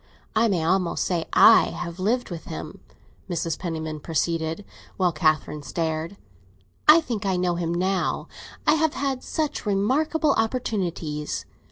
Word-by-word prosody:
I 225 +2 +4
may 180 -6 0
almost 180 +1 +1
say 170 -3 -1
I 225 - +8
have 170 0 -6
lived 230 +4 0
with 170 -2 -6
him," 80 +1 -7 0.5
Mrs. 165 -2 -2
Penniman 160 -3 -4
proceeded, 165 +3 -2 0.3
while 180 -2 +2
Catherine 155 -2 0
stared. 160 +4 -3 0.7
"I 310 +2 +9
think 230 -9 -4
I 190 -2 +1
know 180 -1 +1
him 170 -1 -2
now; 185 +2 0 0.4
I - - +5
have 315 -1 +1
had 270 -2 -1
such 310 -2 -2
remarkable 275 +10 +1
opportunities. 180 - -2
180 Hz, 140 wpm, -24 LUFS, 165-225 Hz, 0.7 s, I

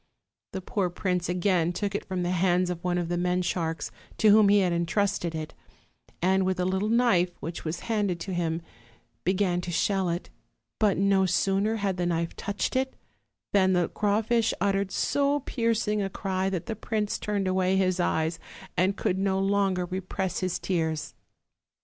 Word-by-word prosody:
The 190 - -3
poor 185 0 -1
prince 180 0 -1
again 180 -2 +2
took 205 +2 -2
it 205 - -3
from 185 -2 -2
the 175 - 0
hands 180 0 +2
of 175 -1 -6
one 180 -1 0
of 175 -1 -1
the 175 +1 -1
men 180 +1 +1
sharks 165 -3 -2 0.3
to 215 - +5
whom 210 -1 +6
he 205 0 +5
had 180 -2 +1
intrusted 170 0 0
it, 155 -1 -5 0.7
and, 190 +1 +3
with 185 0 0
a 180 - +1
little 190 +3 0
knife 210 -7 +3
which 165 +3 -5
v/as 160 +1 -4
handed 205 -6 -1
to 190 - -4
him, 170 -1 -1 0.6
began 185 -1 +1
to 180 - -6
shell 190 +1 +1
it; 170 +1 -4 0.5
but 210 -3 +3
no 195 -1 +3
sooner 195 +4 +1
had 200 -3 -1
the 175 -1 0
knife 170 -1 -1
touched 205 +4 -3
it, 265 0 0 0.6
than 190 -2 +4
the 175 -2 +2
crawfish 220 +2 +1
uttered 200 -1 +1
so 285 0 +1
piercing 230 -4 0
a 195 - -1
cry 190 -1 -1
that 185 -4 -3
the 225 - -3
prince 215 -1 -2
turned 205 -2 -1
away 185 0 +2
his 185 -1 +1
eyes, 160 -1 0 0.4
and 185 +3 +2
could 185 - 0
no 195 -1 +1
longer 195 -2 +1
repress 185 0 -3
his 185 -2 -1
tears. 160 -4 -2
190 Hz, 180 wpm, -27 LUFS, 175-200 Hz, 0.7 s, whom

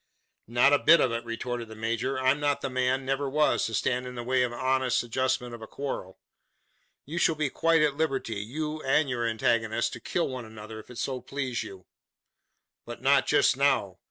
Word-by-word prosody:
"Not 120 +5 +4
a 145 - +5
bit 165 +2 +6
of 125 - +2
it," 115 0 -2
retorted 115 +1 -4
the 110 - -10
major. 115 +4 -2
"I'm 130 +2 +2
not 145 -1 0
the 135 - -3
man 130 +1 0
never 135 +1 -1
was 150 +2 +2
to 115 - -6
stand 125 +4 0
in 125 - -8
the 120 - -5
way 130 +1 +1
of 125 - +2
the 120 - -8
honest 130 -1 +1
adjustment 125 0 -1
of 120 - -9
a 110 - -8
quarrel. 120 -10 -5 0.9
You 165 +5 -4
shall 165 - +3
be 150 -3 -1
quite 165 -1 +3
at 145 -2 +1
liberty 135 -8 -1
you 150 +9 -4
and 135 +1 +2
your 120 -1 -1
antagonist 115 0 0
to - - -7
kill 175 - -1
one 130 -2 -5
another, 110 0 -9
if - - -14
it 125 - -10
so 130 0 -3
please 130 -1 -3
you. 95 -2 -9 1.0
But 120 +1 -9
not 135 0 +4
just - - +4
now. 135 -9 +1
130 Hz, 210 wpm, -27 LUFS, 115-140 Hz, 1.0 s, bit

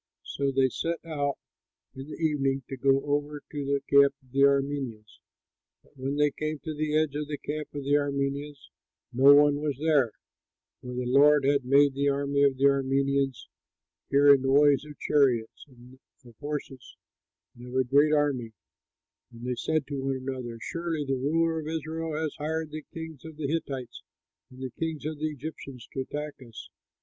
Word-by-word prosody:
So 140 -1 -2
they 135 -1 +3
set 165 +6 -2
out 145 -3 -2 0.6
in 135 +1 -9
the - - -6
evening 135 -4 0
to 135 - -4
go 135 +1 +2
over 145 +1 -2
to 145 -2 -4
the 140 0 0
camp 140 0 +5
of 130 - -26
the 135 - -2
Arameans. 140 -6 0 0.6
But - - -28
when 135 +1 -3
they 150 0 +3
came 155 +2 -3
to 155 - -4
the 155 0 0
edge 155 -2 +1
of 150 0 -3
the 145 -1 -4
camp 150 +1 -5
of 145 - -4
the 140 +1 0
Arameans, 140 0 -3 0.4
no 135 +3 +7
one 145 0 +5
was 145 -4 -2
there, 145 -6 +2 0.7
for 125 0 -7
the 125 0 -2
Lord 140 +3 +5
had 140 -2 +2
made 140 +2 +5
the 140 +1 +1
army 140 0 0
of 140 -2 +3
the 135 - -2
Arameans 135 -1 +1 0.6
hear 140 +1 +7
a 140 - +4
noise 140 +2 +4
of 150 -1 -11
chariots 125 -6 +1
and 125 -1 -17 0.3
of 120 -2 -15
horses 145 -4 -6 0.6
and 120 +1 -11
of 125 - -8
a 130 - +3
great 140 +4 +3
army, 140 -7 0 0.8
and 120 0 -10
they 125 - -1
said 155 +4 -1
to 140 -1 -4
one 135 0 -1
another, 130 -3 -5
"Surely 165 +1 -3
the 135 - -1
ruler 160 +5 +1
of 155 - -6
Israel 160 0 -4
has 160 -2 -2
hired 160 +1 -3
the 155 0 -5
kings 160 -3 -8
of 160 -2 -10
the 155 - -4
Hittites 135 -5 -4 0.5
and 130 +1 -11
the 130 - -4
kings 160 0 -4
of 155 -1 -4
the 155 +1 -1
Egyptians 140 -4 -8
to - - -4
attack 150 +2 -6
us." 115 -3 -11
140 Hz, 185 wpm, -27 LUFS, 135-150 Hz, 0.8 s, no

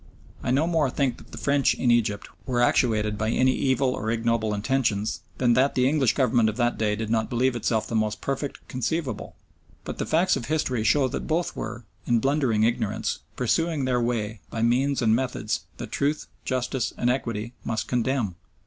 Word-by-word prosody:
I - - -3
no 135 +5 +3
more 165 -5 +2
think 130 -2 0
that - - -16
the - - -9
French 140 -1 +2
in 125 - +2
Egypt 110 -4 +1 0.2
were 125 -2 0
actuated 110 -4 +2
by 110 0 0
any 130 +2 +3
evil 130 0 +1
or 110 -3 -3
ignoble 115 -1 +1
intentions 110 -1 0 0.2
than 120 -2 +3
that 130 +4 +3
the 125 0 +3
English 135 -4 +2
Government 120 -4 +3
of 110 - -5
that 120 -1 +1
day 105 -1 +1
did 110 0 -4
not 110 -1 +1
believe 125 +1 +1
itself 110 -1 0
the - - -7
most 110 -1 0
perfect 135 +1 -4
conceivable, 130 0 -3 0.5
but - - -6
the - - -2
facts 175 +4 +3
of 130 -4 -4
history 130 -7 0
show 135 +4 +3
that 135 - -4
both 165 +2 0
were, 120 -1 -6 0.2
in 120 - +4
blundering 130 -3 +2
ignorance, 115 +1 0 0.2
pursuing 155 +3 +1
their 125 -1 +1
way 110 -4 -2
by 115 - -2
means 130 +3 +2
and 110 -1 +4
methods 130 +1 -2
that - - -7
truth, 145 +2 0 0.2
justice, 125 -1 -1
and 120 - +2
equity 115 -3 -3
must 110 -1 -2
condemn. 125 -4 0
120 Hz, 190 wpm, -25 LUFS, 110-135 Hz, 0.5 s, in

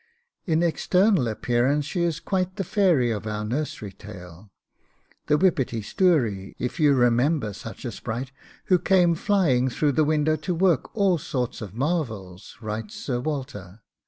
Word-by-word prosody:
'In 165 0 +2
external 180 - +2
appearance 120 +6 +1
she 175 +4 -2
is 170 -3 0
quite 185 -1 -2
the 195 - -2
fairy 170 - +2
of 110 0 -4
our 105 0 -3
nursery 120 -4 -3
tale, 95 -1 -12 0.8
the 150 - +4
WHIPPETY 135 - +1
STOURIE, 115 - +1
if 125 +7 -4
you 145 -3 +5
remember 120 0 +2
such - - -9
a - - -3
sprite, 125 +4 -5 0.3
who 180 -2 +3
came 180 -2 +3
flying 160 - +2
through 145 +4 +1
the 155 +3 +2
window 155 +1 +2
to 180 +1 -3
work 180 -1 +2
all 190 -5 +3
sorts 125 -7 -3
of 105 -2 -8
marvels,' 115 - -3
writes 110 - -5
Sir 140 - -3
Walter. 120 - -5
140 Hz, 155 wpm, -25 LUFS, 110-170 Hz, 0.8 s, you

